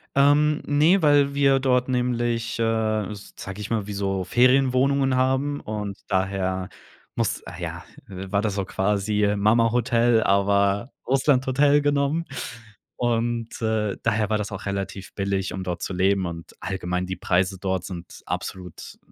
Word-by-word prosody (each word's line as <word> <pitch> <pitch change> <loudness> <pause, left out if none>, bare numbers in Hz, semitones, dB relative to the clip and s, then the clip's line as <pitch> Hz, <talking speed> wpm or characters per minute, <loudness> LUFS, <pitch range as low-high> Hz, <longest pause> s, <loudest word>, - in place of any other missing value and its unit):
Ähm, 145 +2 +4
ne, 155 +7 +4
weil 145 -2 +4
wir 135 -1 +4
dort 125 -1 +2
nämlich, 120 -2 -1
äh, - - +2 0.5
sage 100 0 -9
ich 105 - -6
mal, 110 -3 -1
wie 105 - -5
so 95 -2 -2
Ferienwohnungen 130 +2 +3
haben 130 +3 +1
und 105 -2 -5
daher 95 -1 -1 0.5
muss - - -1
ah, 90 - -8
ja, 85 0 -6 0.2
äh, 95 0 -7
war 100 +1 +1
das 105 -2 -1
so 100 -2 -1
quasi 105 +1 0
Mamahotel, 115 +2 +3
aber 100 +3 +2 0.2
Russlandhotel 135 +2 +3
genommen. 145 +3 +1 0.7
Und, 115 -1 0
äh, 110 -2 0
daher 110 -2 +1
war 110 - +2
das 105 0 -4
auch 105 0 -7
relativ 100 0 -5
billig, 100 -1 -1
um 95 - -4
dort 90 -2 -4
zu 95 - -3
leben, 95 +1 +2
und 85 -1 -7
allgemein 90 -1 -3
die 95 - -3
Preise 95 +2 0
dort 95 -1 -2
sind 90 -3 -9
absolut 90 -3 -6
105 Hz, 145 wpm, -24 LUFS, 95-130 Hz, 0.7 s, Ähm